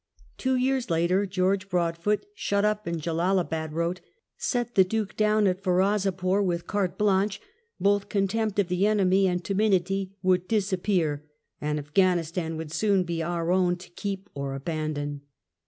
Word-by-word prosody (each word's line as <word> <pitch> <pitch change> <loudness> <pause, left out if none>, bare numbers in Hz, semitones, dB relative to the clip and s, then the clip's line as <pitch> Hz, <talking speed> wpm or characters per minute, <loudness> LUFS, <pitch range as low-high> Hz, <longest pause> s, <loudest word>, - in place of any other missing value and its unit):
Two 260 0 +1
years 255 -1 0
later, 175 +4 +2
George 185 +1 0
Broadfoot, 175 - 0
shut 200 - 0
up 210 -1 0
in 170 -1 -2
Jellalabad, 165 -1 0
wrote, 170 +3 -1 0.4
"^et 240 -1 -1
the 190 - +6
Duke 210 +1 -2
down 215 0 +3
at 185 0 +1
Ferozepore 190 0 +1
with 175 -3 -1
carte 200 -3 -1
blanche; 200 -1 +2 0.4
both 200 0 +2
contempt 205 +1 0
of 200 -3 +2
the 180 +3 +1
enemy 195 -2 +3
and 180 -1 -1
timidity 195 -1 0
would 185 -1 +2
dis 205 -2 0
appear, 160 -6 0 0.3
and 150 0 -1
Afghanistan 165 +1 0
would 160 -1 -6
soon 200 +1 +2
be 170 -1 -3
our 170 +1 -1
own 180 -1 +3
to 175 0 -14
keep 195 +2 -5
or 140 -1 -4
abandon." 145 -1 -3
185 Hz, 155 wpm, -26 LUFS, 170-200 Hz, 0.4 s, the